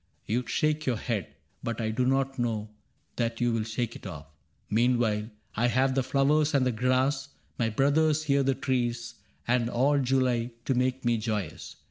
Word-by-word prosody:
You 120 Hz, +2 st, -1 dB
shake 155 Hz, -1 st, 0 dB
your 125 Hz, -3 st, +1 dB
head, 105 Hz, -6 st, -2 dB, 0.3 s
But 115 Hz, 0 st, -3 dB
I 110 Hz, -1 st, -1 dB
do 125 Hz, +3 st, 0 dB
not 135 Hz, 0 st, +1 dB
know 110 Hz, -3 st, -1 dB, 0.5 s
that 115 Hz, -1 st, -1 dB
you 120 Hz, -1 st, +2 dB
will 115 Hz, -, +1 dB
shake 115 Hz, +1 st, -3 dB
it -, -, -8 dB
off. 80 Hz, -5 st, -8 dB
^^ -, -, -28 dB, 0.4 s
Meanwhile 115 Hz, -1 st, +1 dB, 0.3 s
I 115 Hz, +3 st, +2 dB
have 130 Hz, +2 st, +2 dB
the 135 Hz, -, +2 dB
flowers 145 Hz, +3 st, +2 dB
and 135 Hz, -2 st, +3 dB
the 125 Hz, -, +2 dB
grass,^ 130 Hz, +4 st, +1 dB, 0.3 s
My 115 Hz, -2 st, +2 dB
brothers 145 Hz, +6 st, +2 dB
here 140 Hz, -2 st, +2 dB
the 135 Hz, 0 st, +1 dB
trees, 120 Hz, -4 st, -1 dB, 0.3 s
and 120 Hz, -1 st, +2 dB
all 140 Hz, +4 st, +2 dB
July 125 Hz, -2 st, +1 dB
To 135 Hz, -, +1 dB
make 130 Hz, +1 st, 0 dB
me 120 Hz, -1 st, +2 dB
joyous. 105 Hz, -7 st, -4 dB
125 Hz, 180 wpm, -28 LUFS, 115-135 Hz, 0.5 s, and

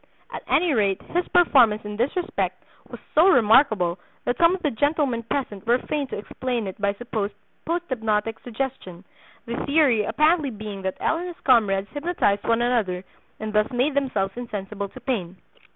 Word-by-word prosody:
At -, -, -6 dB
any 340 Hz, -2 st, +2 dB
rate 200 Hz, -5 st, +1 dB
his 355 Hz, +1 st, 0 dB
performance 240 Hz, -11 st, +4 dB
in 210 Hz, 0 st, -5 dB
this 240 Hz, +6 st, -1 dB
respect 365 Hz, +1 st, -2 dB, 0.3 s
was -, -, -9 dB
so 320 Hz, +4 st, +6 dB
remarkable 215 Hz, -, +4 dB, 0.3 s
that 245 Hz, -, -1 dB
some 340 Hz, +2 st, +5 dB
of 375 Hz, -, -10 dB
the 300 Hz, -, +1 dB
gentlemen 285 Hz, -1 st, 0 dB
present 230 Hz, -3 st, -4 dB
were 240 Hz, +1 st, +4 dB
fain 285 Hz, +2 st, -3 dB
to -, -, -5 dB
explain 240 Hz, +2 st, -3 dB
it 190 Hz, +1 st, -7 dB
by 200 Hz, 0 st, +1 dB
supposed 215 Hz, -2 st, -4 dB, 0.3 s
'post 345 Hz, +1 st, -1 dB
hypnotic 225 Hz, -3 st, -1 dB
suggestion,' 235 Hz, -7 st, -5 dB, 0.4 s
the 235 Hz, +1 st, -4 dB
theory 280 Hz, -7 st, +3 dB
apparently 305 Hz, +6 st, +2 dB
being 210 Hz, -3 st, -7 dB
that 190 Hz, 0 st, -3 dB
L. -, -, +1 dB
and 355 Hz, -, -5 dB
his 350 Hz, -, -9 dB
comrades 200 Hz, -6 st, +3 dB
hypnotized 290 Hz, -, 0 dB
one 230 Hz, +1 st, +2 dB
another, 210 Hz, -7 st, 0 dB, 0.4 s
and 215 Hz, 0 st, -5 dB
thus 210 Hz, 0 st, +2 dB
made 255 Hz, +4 st, 0 dB
themselves 225 Hz, -9 st, -1 dB
insensible 205 Hz, -4 st, -5 dB
to 255 Hz, -, -12 dB
pain. 210 Hz, -8 st, -3 dB
235 Hz, 175 wpm, -24 LUFS, 205-280 Hz, 0.4 s, so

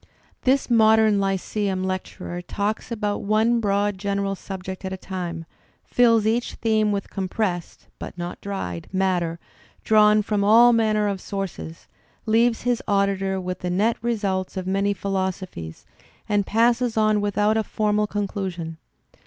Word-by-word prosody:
This 270 Hz, +1 st, +3 dB
modem 220 Hz, -3 st, +4 dB
lyceum 195 Hz, 0 st, -1 dB
lecturer 185 Hz, -1 st, -4 dB
talks 205 Hz, +5 st, -3 dB
about 210 Hz, -3 st, -2 dB
one 220 Hz, +3 st, +2 dB
broad 205 Hz, -2 st, 0 dB
general 200 Hz, 0 st, -1 dB
subject 190 Hz, 0 st, -7 dB
at 190 Hz, -, -4 dB
a 190 Hz, -, -4 dB
time, 175 Hz, -3 st, -5 dB, 0.4 s
fills 230 Hz, -3 st, +3 dB
each 230 Hz, +2 st, 0 dB
theme 215 Hz, -2 st, +1 dB
with 200 Hz, -1 st, -3 dB
compressed 185 Hz, -2 st, -3 dB
(but -, -, -8 dB
not 175 Hz, 0 st, -6 dB
dried) 90 Hz, -, -5 dB
matter 180 Hz, -3 st, 0 dB, 0.5 s
drawn 215 Hz, -1 st, +5 dB
from 205 Hz, -1 st, 0 dB
all 235 Hz, +4 st, +7 dB
manner 215 Hz, -2 st, +2 dB
of 195 Hz, -2 st, -2 dB
sources, 195 Hz, -4 st, -6 dB, 0.4 s
leaves 230 Hz, +1 st, +2 dB
his 245 Hz, -1 st, +1 dB
auditor 195 Hz, -1 st, +1 dB
with 185 Hz, 0 st, -4 dB
the 180 Hz, -, -3 dB
net 210 Hz, +6 st, +2 dB
results 200 Hz, -5 st, -2 dB
of 185 Hz, -, -3 dB
many 195 Hz, +2 st, +1 dB
philosophies, 190 Hz, -, -4 dB, 0.4 s
and 205 Hz, -2 st, +1 dB
passes 235 Hz, +1 st, +2 dB
on 215 Hz, -1 st, +3 dB
without 205 Hz, +1 st, +1 dB
a 220 Hz, -, +1 dB
formal 210 Hz, 0 st, 0 dB
con 205 Hz, -1 st, -2 dB
clusion. 175 Hz, -5 st, -5 dB
200 Hz, 145 wpm, -23 LUFS, 190-215 Hz, 0.5 s, all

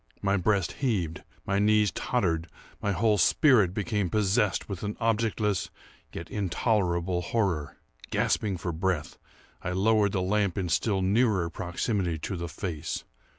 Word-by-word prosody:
My 100 Hz, 0 st, +2 dB
breast 100 Hz, 0 st, +1 dB
heaved, 95 Hz, -, -1 dB, 0.2 s
my 100 Hz, 0 st, +1 dB
knees 105 Hz, -1 st, +4 dB
tottered, 85 Hz, -10 st, -1 dB, 0.3 s
my 100 Hz, -, 0 dB
whole 105 Hz, +2 st, +2 dB
spirit 105 Hz, -, +5 dB
became 105 Hz, -1 st, -1 dB
possessed 100 Hz, -1 st, +1 dB
with 95 Hz, -4 st, -5 dB
an 105 Hz, 0 st, -4 dB
objectless 110 Hz, -4 st, 0 dB, 0.4 s
yet 80 Hz, -, -7 dB
intolerable 90 Hz, -3 st, 0 dB
horror. 90 Hz, -7 st, -1 dB, 0.3 s
Gasping 100 Hz, -4 st, 0 dB
for 85 Hz, +1 st, -3 dB
breath, 85 Hz, -1 st, -2 dB, 0.4 s
I 90 Hz, -, -3 dB
lowered 105 Hz, +1 st, +3 dB
the 95 Hz, -, 0 dB
lamp 100 Hz, -1 st, +1 dB
in 90 Hz, -3 st, -1 dB
still 95 Hz, +3 st, +1 dB
nearer 100 Hz, -4 st, +2 dB
proximity 90 Hz, 0 st, -2 dB
to 85 Hz, +6 st, -4 dB
the 85 Hz, -1 st, -4 dB
face. 80 Hz, -1 st, -4 dB
95 Hz, 140 wpm, -28 LUFS, 85-105 Hz, 0.4 s, spirit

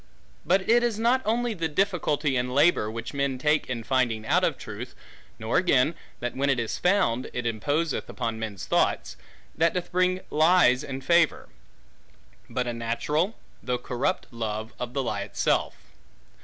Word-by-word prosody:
But 190 Hz, +3 st, +2 dB
it 235 Hz, +1 st, +5 dB
is 235 Hz, -3 st, 0 dB
not 240 Hz, +4 st, +2 dB
only 235 Hz, +2 st, 0 dB
the 165 Hz, -5 st, -2 dB
difficulty 155 Hz, -5 st, 0 dB
and 125 Hz, 0 st, -1 dB
labor, 145 Hz, -7 st, +4 dB
which 115 Hz, +1 st, -6 dB
men 140 Hz, -2 st, -1 dB
take 150 Hz, +2 st, +1 dB
in 120 Hz, -3 st, -3 dB
finding 120 Hz, -4 st, 0 dB
out -, -, +2 dB
of -, -, +1 dB
truth, -, -, -8 dB, 0.4 s
nor 110 Hz, +1 st, 0 dB
again, 155 Hz, -4 st, +3 dB, 0.3 s
that 120 Hz, 0 st, -3 dB
when 140 Hz, +1 st, 0 dB
it 135 Hz, -3 st, +2 dB
is 115 Hz, -2 st, -3 dB
found, 180 Hz, -, +1 dB
it 125 Hz, -1 st, -3 dB
imposeth 145 Hz, +7 st, -1 dB
upon 115 Hz, -1 st, -3 dB
men's 105 Hz, -4 st, -5 dB
thoughts, 60 Hz, -, 0 dB, 0.4 s
that 165 Hz, +2 st, +1 dB
doth 180 Hz, -1 st, -3 dB
bring 185 Hz, 0 st, +1 dB
lies 155 Hz, -5 st, +4 dB
in 135 Hz, -1 st, -5 dB
favor; 170 Hz, +2 st, +2 dB, 1.0 s
but 125 Hz, -, -1 dB
a 120 Hz, -, -2 dB
natural, 150 Hz, -, -1 dB, 0.2 s
though 125 Hz, -1 st, -1 dB
corrupt 125 Hz, +8 st, -2 dB
love, 110 Hz, -1 st, -4 dB
of 125 Hz, 0 st, -5 dB
the 135 Hz, -, 0 dB
lie 105 Hz, -4 st, -2 dB
itself. -, -, 0 dB
135 Hz, 165 wpm, -26 LUFS, 120-175 Hz, 1.0 s, it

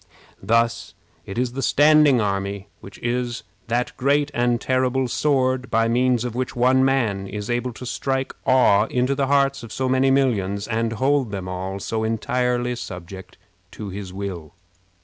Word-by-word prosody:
Thus 115 Hz, +3 st, 0 dB, 0.3 s
it 95 Hz, -, -6 dB
is 125 Hz, 0 st, -1 dB
the 135 Hz, -, -3 dB
standing 150 Hz, -2 st, +5 dB
army 100 Hz, -1 st, -2 dB
which 95 Hz, -, -12 dB
is 120 Hz, 0 st, -2 dB, 0.2 s
that 120 Hz, +1 st, -1 dB
great 140 Hz, +2 st, +1 dB
and 120 Hz, 0 st, +1 dB
terrible 130 Hz, 0 st, 0 dB
sword 130 Hz, -1 st, 0 dB
by 115 Hz, 0 st, +2 dB
means 125 Hz, 0 st, +2 dB
of 120 Hz, -, -4 dB
which 130 Hz, +2 st, -3 dB
one 130 Hz, +2 st, +3 dB
man 115 Hz, -8 st, +1 dB
is 105 Hz, +3 st, -5 dB
able 120 Hz, +1 st, -1 dB
to 125 Hz, -, -9 dB
strike 135 Hz, +1 st, -2 dB
awe 110 Hz, -5 st, +4 dB
into 125 Hz, +2 st, 0 dB
the 135 Hz, 0 st, 0 dB
hearts 140 Hz, 0 st, +2 dB
of 115 Hz, -2 st, -10 dB
so 130 Hz, +2 st, -2 dB
many 130 Hz, +1 st, +3 dB
millions, 105 Hz, -7 st, +1 dB
and 115 Hz, 0 st, -1 dB
hold 135 Hz, +1 st, +1 dB
them 95 Hz, -2 st, -5 dB
all 95 Hz, +1 st, -4 dB
so 110 Hz, +2 st, -3 dB
entirely 125 Hz, +2 st, 0 dB
subject 90 Hz, -3 st, -9 dB, 0.4 s
to 105 Hz, -, -7 dB
his 95 Hz, -1 st, -7 dB
will. 95 Hz, -5 st, -6 dB
120 Hz, 165 wpm, -22 LUFS, 105-130 Hz, 0.4 s, standing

